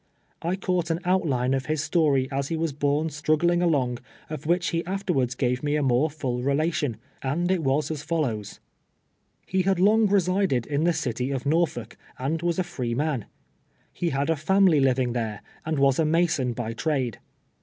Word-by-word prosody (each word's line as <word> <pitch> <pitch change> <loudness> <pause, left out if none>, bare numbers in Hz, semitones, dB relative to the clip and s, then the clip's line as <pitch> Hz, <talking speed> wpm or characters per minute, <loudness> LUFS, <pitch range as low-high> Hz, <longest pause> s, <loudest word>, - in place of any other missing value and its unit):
I 175 +3 -1
caught 180 -3 -1
an 165 0 0
outline 140 -9 +1
of 130 -1 -2
his 155 -1 0
story 150 -5 +2
as 135 0 -1
he 165 - -2
was 160 -2 -1
borne 145 +3 0
struggling 155 +4 +1
along, 135 -8 +1 0.3
of 155 -1 -6
which 175 +1 +2
he 170 0 -1
afterwards 175 -11 -1
gave 125 0 0
me 150 0 0
a 150 - +1
more 135 +4 +2
full 130 -5 -3
relation, 140 -2 0 0.2
and 165 +7 0
it 185 -3 +1
was 145 +2 0
as 150 -2 -4
follows: 140 -11 -2 0.9
lie 190 - +3
had 190 -1 +1
long 215 +3 +5
resided 185 - +2
in 150 +2 0
the 175 - +4
city 135 -5 -2
of 135 -3 -2
Xorfolk, 140 -7 0 0.2
and 145 +6 -1
Avas 170 0 -1
a 185 - +1
free 125 -9 -3
num. 140 -5 -1 0.7
He 175 - -1
had 140 +2 0
a - - +2
family 185 +1 +4
living 130 -2 +2
there, 110 -4 -3 0.2
and 160 -1 0
was 135 0 +3
a 160 - +3
mason 155 -6 +1
by 115 -1 -4
trade. 125 -2 -1
150 Hz, 185 wpm, -25 LUFS, 130-170 Hz, 0.9 s, long